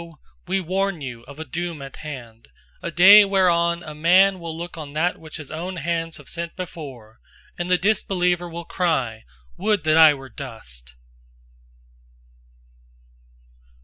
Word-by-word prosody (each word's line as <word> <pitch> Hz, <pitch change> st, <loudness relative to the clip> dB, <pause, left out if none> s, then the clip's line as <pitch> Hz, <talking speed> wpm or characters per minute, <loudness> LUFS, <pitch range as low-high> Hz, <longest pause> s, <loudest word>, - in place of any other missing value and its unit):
We 190 Hz, +2 st, +1 dB
warn 190 Hz, 0 st, -1 dB
you 125 Hz, -4 st, -6 dB
of 140 Hz, +1 st, -12 dB
a 160 Hz, -, -6 dB
doom 170 Hz, +3 st, -4 dB
at 135 Hz, -, -10 dB
hand, 120 Hz, -7 st, -9 dB, 0.3 s
a -, -, -3 dB
day 190 Hz, +6 st, +9 dB
whereon 175 Hz, -3 st, +2 dB
a 155 Hz, -, -7 dB
man 185 Hz, +5 st, +4 dB
will 165 Hz, -1 st, -6 dB
look 175 Hz, +1 st, -6 dB
on 150 Hz, -3 st, -8 dB
that 170 Hz, +4 st, 0 dB
which 160 Hz, 0 st, -10 dB
his 150 Hz, -3 st, -9 dB
own 175 Hz, +4 st, -5 dB
hands 165 Hz, 0 st, -2 dB
have 145 Hz, -, -15 dB
sent 170 Hz, 0 st, -5 dB
before, 135 Hz, -11 st, -9 dB, 0.4 s
and 175 Hz, +1 st, -4 dB
the 180 Hz, -, +4 dB
disbeliever 180 Hz, -2 st, 0 dB
will 170 Hz, 0 st, -7 dB
cry: 135 Hz, -, -1 dB, 0.3 s
"Would 210 Hz, -6 st, +1 dB
that 155 Hz, 0 st, +3 dB
I 160 Hz, -2 st, +8 dB
were 135 Hz, -1 st, -11 dB
dust!" 65 Hz, -, -9 dB
165 Hz, 145 wpm, -23 LUFS, 145-180 Hz, 0.4 s, day